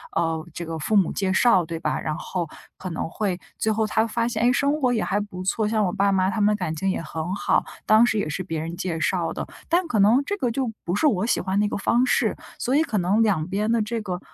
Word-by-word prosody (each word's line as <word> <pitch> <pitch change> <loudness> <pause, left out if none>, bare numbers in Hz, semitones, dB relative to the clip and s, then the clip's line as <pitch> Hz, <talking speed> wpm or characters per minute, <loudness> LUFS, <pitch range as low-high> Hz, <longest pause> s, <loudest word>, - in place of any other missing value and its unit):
呃， 165 -1 0
这 170 - -5
个 165 0 -4
父 210 +7 -1
母 190 -4 +4
介 190 -2 0
绍， 190 -6 +4
对 165 0 -5
吧？ 155 - -1
然 155 - -3
后 175 -2 -3 0.3
可 185 - -6
能 165 - -3
会 190 -1 -2 0.2
最 220 - +1
后 220 0 +1
他 220 +1 +2
发 230 +1 -1
现， 230 -1 -1
哎， 245 - +5
生 285 +4 +1
活 250 -1 +3
也 220 - 0
还 205 +1 0
不 185 -3 -6
错， 210 +3 0
像 215 -1 +1
我 180 - 0
爸 200 0 +2
妈 190 0 +2
他 215 - -2
们 210 +1 +4
感 175 -5 -3
情 190 +4 -1
也 185 - -1
很 160 +3 -4
好， - - +1 0.2
当 220 +2 +6
时 225 - 0
也 175 - -1
是 185 +4 -3
别 160 -2 -4
人 165 +2 -5
介 170 -3 -3
绍 170 0 0
的。 - - -5 0.2
但 345 +1 +2
可 230 - -1
能 230 +8 +5
这 405 - -2
个 245 -8 0
就 250 -2 -1
不 175 - -2
是 305 - +3
我 210 -5 +1
喜 - - +1
欢 190 +1 0
的 210 - +3
那 - - -1
个 - - -2
方 240 +5 +2
式， - - +1 0.2
所 260 +3 0
以 310 - +4
可 220 -9 -2
能 195 +6 +2
两 180 -7 +1
边 210 +4 -1
的 230 -1 +2
这 225 +1 -2
个 185 -3 -4
205 Hz, 295 characters per minute, -24 LUFS, 180-225 Hz, 0.3 s, 当